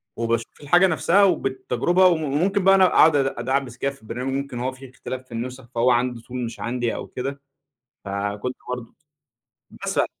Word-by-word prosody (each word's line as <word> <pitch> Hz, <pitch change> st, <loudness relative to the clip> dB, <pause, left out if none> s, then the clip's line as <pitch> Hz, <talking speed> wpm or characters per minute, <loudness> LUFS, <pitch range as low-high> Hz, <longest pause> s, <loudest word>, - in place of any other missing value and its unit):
وباشوف 115 Hz, 0 st, -2 dB
الحاجة 175 Hz, +6 st, +5 dB
نفسها، 170 Hz, +5 st, +3 dB
وبالتجربة 175 Hz, +1 st, +2 dB
و 180 Hz, -, +5 dB
وممكن 160 Hz, +6 st, 0 dB
بقى 195 Hz, +1 st, +6 dB
أنا 190 Hz, -1 st, +6 dB
اقعد 160 Hz, -3 st, +5 dB
اد 140 Hz, -, +3 dB
ادعبس 130 Hz, 0 st, -1 dB
كده 140 Hz, +2 st, -1 dB
في 140 Hz, -, -17 dB
البرنامج 125 Hz, +4 st, -4 dB
ممكن 135 Hz, -3 st, -3 dB
هو 130 Hz, +1 st, -1 dB
في 130 Hz, 0 st, -12 dB
اختلاف 130 Hz, 0 st, -7 dB
في 130 Hz, -, -28 dB
النسخ، 125 Hz, +1 st, -6 dB
فهو 120 Hz, +2 st, +4 dB
عنده 120 Hz, -1 st, 0 dB
tool 125 Hz, -, -23 dB
مش 115 Hz, -, -7 dB
عندي 120 Hz, 0 st, -2 dB
أو -, -, -6 dB
كده، 135 Hz, +2 st, -5 dB, 0.6 s
فكنت 100 Hz, +5 st, -3 dB
برضه 125 Hz, -2 st, -6 dB, 0.9 s
مثلًا. -, -, +1 dB
130 Hz, 175 wpm, -23 LUFS, 120-145 Hz, 0.9 s, بقى